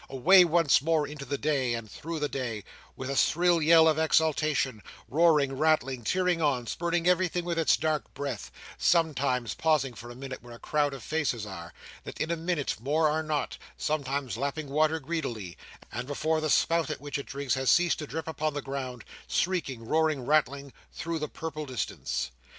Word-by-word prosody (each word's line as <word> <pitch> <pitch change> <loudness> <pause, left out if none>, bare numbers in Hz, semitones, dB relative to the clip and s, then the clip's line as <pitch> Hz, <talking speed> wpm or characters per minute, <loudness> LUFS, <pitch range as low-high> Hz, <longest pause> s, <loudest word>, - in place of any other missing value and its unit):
Away 180 +9 +6
once 165 -5 +4
more 160 0 +1
into 145 -1 -8
the 140 +2 -2
day, 135 -5 0
and 115 -1 -6
through 165 +9 -6
the 150 -1 0
day, 120 -7 -4 0.3
with 130 - -6
a - - -2
shrill 175 +3 +3
yell 160 +1 +6
of 160 -1 +3
exultation, 155 -6 +1 0.3
roaring, 150 -3 +3
rattling, 135 -4 +1
tearing 180 +6 +1
on, 135 -5 +1
spurning 170 +5 -1
everything 180 -1 +2
with 170 -1 -1
its 160 - +4
dark 155 -1 -1
breath, 140 -7 -4 0.3
sometimes 140 -7 +1
pausing 150 -5 +1
for 120 +1 -10
a 120 - -9
minute 135 0 -7
where 120 0 -11
a - - -14
crowd 145 -2 0
of 130 - -10
faces 145 -8 -1
are, 85 -4 -8 0.3
that - - -9
in 160 - -1
a - - +1
minute 165 -3 -2
more 150 +5 +2
are 155 +1 0
not; 155 -2 -2 0.2
sometimes 140 -5 -2
lapping 140 +3 -3
water 155 +3 +2
greedily, 130 - -4 0.4
and 125 - -5
before 155 +2 0
the 155 - -1
spout 165 +2 +2
at 155 - -4
which 145 -1 -4
it 140 - -7
drinks 140 -2 -2
has 130 -1 0
ceased 175 -1 +4
to 150 - -5
drip 160 +2 -5
upon 155 -1 -2
the 145 - -2
ground, 130 -3 -5 0.2
shrieking, 140 -10 -1
roaring, 155 -1 +1
rattling 140 -2 +1 0.2
through 165 -1 -4
the 150 - -3
purple 155 -2 -6
distance! 125 - -3
150 Hz, 185 wpm, -28 LUFS, 130-160 Hz, 0.4 s, Away